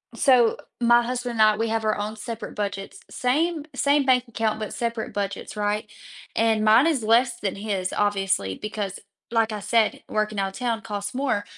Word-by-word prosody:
So, 245 -3 +4 0.2
my 240 0 +5
husband 245 0 -3
and 225 - 0
I, 215 0 +5
we 225 - 0
have 225 0 -1
our 215 - +2
own 210 +1 -3
separate 225 +1 -7
budgets. 200 -1 -4
Same 300 +5 0
same 280 +1 +2
bank 255 -2 +4
account, 220 -1 -1
but 215 -2 -5
separate 230 -2 -3
budgets, 200 0 -4
right? 210 0 -1 0.5
And 220 -1 +2
mine 225 +7 +6
is 290 -8 +1
less 235 +2 +3
than 195 -4 -2
his, 195 -3 -3
obviously, 195 - 0
because, 210 -2 -5 0.3
like 225 -1 +2
I 210 - -4
said, 220 +2 +1
working 215 -1 -1
outta 195 0 -2
town 235 -3 -1
costs 205 -1 -5
more, 250 -6 0
220 Hz, 180 wpm, -24 LUFS, 205-240 Hz, 0.5 s, mine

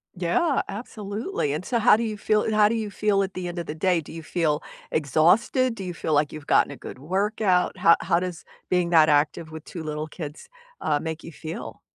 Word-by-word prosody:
Yeah, 185 - +1
absolutely. 205 - -4
And 155 - -3
so 235 +2 0
how 225 - +6
do 230 - -1
you 215 -2 -3
feel 215 +1 +1
how 210 -1 +5
do 230 - 0
you 220 -2 -2
feel 200 0 +1
at 190 - -5
the 180 -1 -4
end 175 0 -5
of 170 - -5
the 150 - -4
day? 175 0 +2
Do - - -12
you 165 0 -8
feel 155 -3 0 0.3
exhausted? 180 - +3
Do 195 - -6
you 180 -1 -4
feel, 160 -1 -2
like, 145 0 +2
you've 155 -2 -9
gotten - - +4
a - - -7
good - - -9
workout? 190 +3 +1
How 170 - +6
how 170 - +2
does 180 -2 -5 0.3
being 180 -1 +2
that 160 -2 +6
active 150 +2 +1
with 160 -1 -8
2 165 -3 -7
little 155 0 -4
kids, 150 - -8 0.3
uh, 145 -1 +1
make 160 0 -5
you 165 - -9
feel? 160 +2 -7
175 Hz, 225 wpm, -25 LUFS, 155-210 Hz, 0.3 s, how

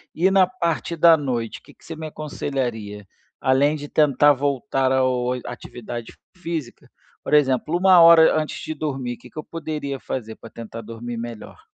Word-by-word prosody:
e 185 +4 +3
na 190 -2 +5
parte 170 -2 -2
da 165 0 +6
noite, 120 -6 -3
que - - -18
que - - -28
você 165 - -8
me 160 0 -6
aconselharia? 120 -9 -4 0.4
Além 135 +3 +3
de 145 -1 -8
tentar 145 -1 +4
voltar 135 -1 0
ao 130 -1 +2
oi 125 0 -2
atividade 120 -1 -8 0.2
física. 165 -8 -6 0.3
Por - - -5
exemplo, 150 +3 +3
1 185 -1 +6
hora 165 -1 +7
antes 155 - -4
de 160 - -4
dormir, 135 -5 -4
que - - -15
que - - -20
eu 155 - -4
poderia 150 -4 -5
fazer 110 -4 -5
pra 115 - -13
tentar 115 0 -9
dormir 115 +2 -7
melhor? 115 -1 -8
140 Hz, 175 wpm, -22 LUFS, 120-155 Hz, 0.4 s, hora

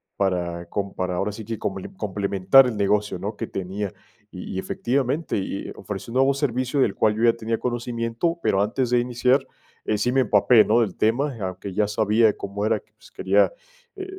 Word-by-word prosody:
para 85 -3 -1
com 100 +1 -3
para 90 -1 -2
ahora 100 +3 -1
sí 110 +1 -8
que 115 +1 -4
comple 95 -1 -4
complementar 100 +4 +3
el 110 -4 -3
negocio, 105 -1 +1
¿no? 100 +4 -4
Que 115 - -5
tenía. 95 +1 -4 0.4
Y 90 +1 -7
y - - -1
efectivamente, 135 - -1
y 100 0 -4
y - - -7
ofrecí 115 - -7
un - - -7
nuevo 135 +1 +4
servicio 130 0 -1
del 105 - +2
cual 105 -1 +2
yo 115 - -2
ya 115 -1 +6
tenía 115 0 -2
conocimiento, 120 +6 -2
pero 95 - +2
antes 120 +4 -1
de 125 - +4
iniciar, 125 +2 +1 0.4
eh, 105 - 0
sí 120 +4 0
me 135 0 +3
empapé, 110 +1 +5
¿no?, 115 +2 +3
del 105 -5 -1
tema, 130 +6 +1
aunque 95 +1 -5
ya 105 +1 +1
sabía 110 +1 +2
cómo 100 +1 -5
era, 110 -1 +1
que, - - -31
pues, - - -19
quería, - - +2 0.4
eh 385 -1 -6
110 Hz, 205 wpm, -23 LUFS, 100-125 Hz, 0.4 s, ya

